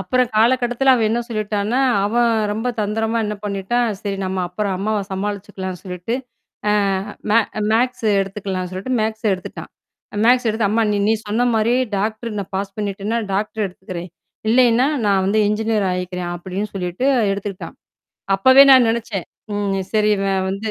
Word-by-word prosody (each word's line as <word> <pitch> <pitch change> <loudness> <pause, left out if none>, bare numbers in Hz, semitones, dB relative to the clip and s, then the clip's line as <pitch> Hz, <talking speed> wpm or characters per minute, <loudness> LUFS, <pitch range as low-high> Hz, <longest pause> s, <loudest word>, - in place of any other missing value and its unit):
அப்புறம் 250 +6 +1
காலகட்டத்தில 245 +3 +3
அவன் 225 -3 +2
என்ன 235 +1 +1
சொல்லிட்டான்னா, 215 +2 -1 0.3
அவன் 235 +3 +2 0.2
ரொம்ப 225 +4 -2
தந்திரமா 220 +2 -1
என்ன 210 0 -2
பண்ணிட்டான், 205 +4 0
சேரி 200 -1 -3
நம்ம 185 0 -2
அப்புறம் 195 +2 -2
அம்மாவ 215 +2 0
சமாளிச்சுக்கலான்னு 190 -2 -4
சொல்லிட்டு. 180 +4 -4 0.6
ஆ - - +3 0.6
மே 225 - +6 0.3
மேக்ஸா 240 -1 +1
எடுத்துக்கலாம்னு 195 -2 -4
சொல்லிட்டு 190 +8 -4
மேக்ஸா 220 +1 -2
எடுத்துட்டான். 185 -1 -6 0.5
மேக்ஸா 250 +1 +4
எடுத்து 220 -1 0
"அம்மா 225 +3 +2 0.3
நீ - - +4
சொன்ன 215 +4 0
மாரி 220 +2 +2 0.2
டாக்டர்நான் 215 -1 -3
பாஸ் 195 0 -4
பண்ணிட்டேன்னா, 205 +2 -2
டாக்டர் 210 +2 -1
எடுத்துக்கிறேன். 180 -1 -8 0.4
இல்லைன்னா, 245 +2 +4 0.2
நான் 195 -2 +3
வந்து 205 +3 +2
என்ஜினியரா 215 -1 0
ஆயிக்கிறேன்" 180 -1 -4
அப்படின்னு 190 +4 -4
சொல்லிட்டு 180 +6 -2 0.3
எடுத்துக்கிட்டான். 195 -1 -6 0.6
அப்பவே 260 +7 +7
நான் 255 -3 +7
நெனச்சேன். 225 -5 -2 0.3
ம் 200 -1 -1
சேரி 215 -1 +3
இவன் 195 -1 0
வந்து. 210 +3 -3
210 Hz, 140 wpm, -20 LUFS, 195-230 Hz, 0.6 s, அப்பவே